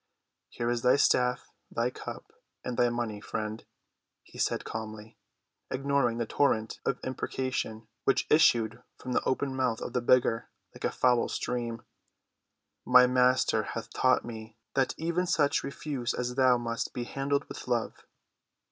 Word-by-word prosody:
"Here 120 0 -2
is 120 -1 -1
thy 125 +1 +5
staff, 125 -2 +2 0.2
thy 120 +2 -1
cup, - - -9 0.3
and 125 - -3
thy 120 0 +3
money, 120 -3 -3
friend," 110 +1 -4 0.6
he - - -14
said - - 0
calmly, 110 0 -7 0.5
ignoring 135 -3 +1
the 120 - -1
torrent 110 -3 +1
of - - 0
imprecation 130 -4 -3 0.2
which 135 - +3
issued 115 -8 +4 0.2
from 130 - -7
the - - +2
open 135 0 0
month 125 -3 0
of - - -6
the 125 - +1
beggar 120 -1 +3 0.2
like - - -6
a - - +1
foul 125 -2 +2
stream. 120 -1 -3 1.0
"My 125 0 +7
Master 125 -3 +3
hath 115 +1 -6
taught 130 -1 +3
me 110 -1 -9 0.2
that 135 -1 +1
even 170 +3 -1
such 145 -2 +2
refuse 140 -3 -3
as 125 0 -2
thou 130 -1 +4
must 115 -1 -3
be 125 - -3
handled 140 +3 -1
with - - -9
love. 120 -2 -1
125 Hz, 150 wpm, -29 LUFS, 115-130 Hz, 1.0 s, My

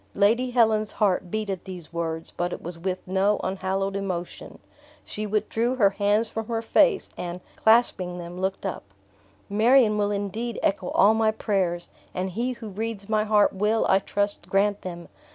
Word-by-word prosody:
Lady 230 +5 +3
Helen's 220 -3 +2
heart 190 -4 +1
beat 215 +2 -2
at 190 -3 -4
these 180 -4 -9
words, 165 -1 -4
but 175 0 -1
it - - -5
was 170 0 -6
with 185 +1 -4
no 195 +2 +2
unhallowed 195 +1 -2
emotion. 185 -3 -5 0.5
She 215 0 -4
withdrew 220 +4 0
her 205 -6 +4
hands 205 +3 +1
from 225 0 -5
her 230 -1 -2
face 400 - +3
and, 175 0 -5 0.2
clasping 220 -6 +3
them, 175 +1 -7
looked 190 +1 -2
up. 190 - -3 0.7
"Marion 215 +1 +4
will 205 0 +1
indeed 205 +3 -3
echo 195 -2 0
all 210 +2 +5
my 220 0 +2
prayers, 190 -5 -1 0.2
and 185 +1 -2
He 240 +7 -1
who 230 -2 -8
reads 215 0 -5
my 215 -1 +2
heart 210 -1 +4
will, 210 +3 +1
I 190 - +4
trust, 205 -2 -2
grant 200 +1 +2
them. 175 -2 -7
205 Hz, 170 wpm, -25 LUFS, 185-220 Hz, 0.7 s, all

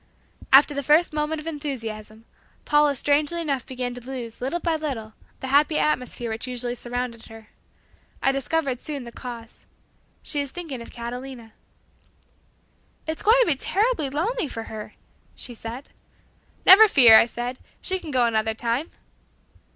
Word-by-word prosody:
After 285 +2 +7
the 280 - -2
first 305 +4 +3
moment 300 +1 -1
of 305 - -10
enthusiasm, 225 -8 -6 0.4
Paula 295 -1 +3
strangely 290 +5 +1
enough 280 -6 -2
began 250 -1 -4
to 245 - -8
lose 245 -3 -7
little 270 +7 -2
by 335 -2 0
little 260 -9 -5 0.3
the 265 - -5
happy 295 +3 +3
atmosphere 250 -5 -1
which 225 +3 -4
usually 245 -1 -3
surrounded 245 -1 -5
her. 225 -1 -14 0.7
I 270 - +2
discovered 275 -1 -1
soon 285 -2 -5
the 235 - -10
cause. 235 -2 -10 0.6
She 295 - -2
was 280 -1 -1
thinking 310 -6 -6
of 235 - -10
Catalina. 240 -1 -8 1.5
"It's 315 0 -4
going 445 +3 +5
to - - +4
be - - +4
terribly 400 - +1
lonely 340 - -1
for 225 -4 -6
her," 215 -1 -9 0.4
she 245 - -6
said. 235 +4 -8 0.8
"Never 435 +4 +10
fear," 240 - +8
I - - +3
said, 240 +2 -5 0.2
"she 375 -1 -1
can 335 - -9
go 255 -4 +2
another 220 -1 0
time." 240 +7 -2
265 Hz, 155 wpm, -24 LUFS, 235-300 Hz, 1.5 s, Never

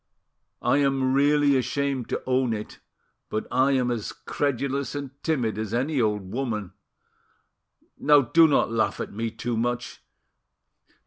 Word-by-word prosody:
"I - - +3
am 135 -2 +2
really 145 0 +4
ashamed 135 0 -1
to - - -3
own 130 -2 +1
it, 105 -1 -7 0.5
but 110 - -2
I 135 +2 +3
am 125 -2 +1
a 120 -2 -1 0.2
credulous 140 -1 -1
and 140 -2 -5
timid 120 -10 -1
as 110 +1 -3
any 135 +2 0
old 105 -4 -1
woman. 110 -7 -3 1.3
Now 145 0 +6
do 160 +6 +5
not 140 -6 +2
laugh 115 -1 0
at - - -5
me 115 +2 -2
too 115 +1 -4
much. 120 +2 -3
130 Hz, 140 wpm, -25 LUFS, 115-140 Hz, 1.3 s, Now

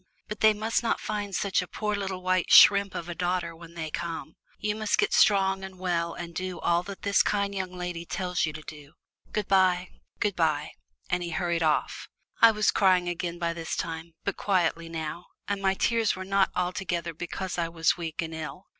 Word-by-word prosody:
But 210 0 -6
they 215 -1 +5
must 220 +2 0
not 230 - 0
find 205 -2 -3
such 195 0 +1
a 185 - -6
poor 210 +2 -2
little 190 -2 -4
white 185 -1 +1
shrimp 200 -1 +7
of 170 - -4
a 175 - -4
daughter 175 -1 -2
when 170 0 -13
they 160 -2 -5
come. 165 -1 -5 0.2
You 210 0 -2
must 215 -1 0
get 415 - +1
strong 195 -2 +4
and 190 -1 -8
well 170 -2 -1
and 170 -1 -7
do 185 +1 -4
all 170 0 +2
that 195 - -8
this 200 0 +4
kind 200 -1 0
young 190 -2 -3
lady 180 -2 -5
tells 180 +1 -2
you 155 - 0
to 155 0 -9
do. 150 0 -11 0.4
Good 210 -2 -2
bye 185 -2 +3 0.3
good 205 -2 0
bye," 155 -3 0 0.4
and 180 0 +1
he 175 - -3
hurried 170 0 -1
off. 155 -2 0 0.3
I 230 - +10
was 215 -1 +2
crying 185 -3 +3
again 175 0 -3
by 170 -1 -1
this 165 -1 -4
time, 165 0 -5
but 200 - -2
quietly 170 -4 0
now, 160 +1 -5 0.2
and 200 -1 -2
my 190 0 +2
tears 230 0 +1
were 185 0 -6
not 195 0 +2
altogether 175 -2 -2
because 175 +3 -4
I 165 -1 0
was 165 -1 +2
weak 165 -1 -4
and 165 0 -6
ill. 160 +4 -7
180 Hz, 210 wpm, -27 LUFS, 170-195 Hz, 0.4 s, I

